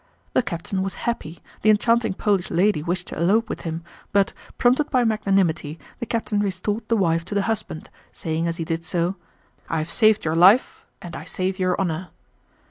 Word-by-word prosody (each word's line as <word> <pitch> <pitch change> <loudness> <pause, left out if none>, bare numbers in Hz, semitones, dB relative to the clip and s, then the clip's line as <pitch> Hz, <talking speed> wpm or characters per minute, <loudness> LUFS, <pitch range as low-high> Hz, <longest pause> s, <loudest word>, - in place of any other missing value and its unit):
The - - +4
captain 190 -1 -3
was 195 0 -3
happy, 175 -9 -3 0.2
the 215 - +3
enchanting 230 -1 +3
Polish 200 -4 0
lady 180 -1 +2
wished 175 +3 -2
to - - -6
elope 205 +7 +3
with - - -4
him, 165 0 -4 0.3
but, 200 -1 +2 0.2
prompted 260 +5 +3
by 255 -3 +3
magnanimity, 195 -8 +1 0.2
the 235 - -4
captain 225 -2 -1
restored 205 +2 -1
the 230 - +2
wife 165 -4 +2
to 205 - -5
the 200 - +2
husband, 220 -7 -3 0.2
saying 160 +1 -2
as 165 0 -2
he 165 - -3
did 165 0 -2
so: 175 +2 -1 0.5
"I 165 - 0
have 155 +1 -2
saved 215 -4 +3
your 155 0 +1
life, 190 +9 +5 0.2
and 175 -2 -7
I - - -7
save 185 +1 -2
your 185 -1 +1
honor!" 180 -1 -1
190 Hz, 190 wpm, -23 LUFS, 170-215 Hz, 0.5 s, life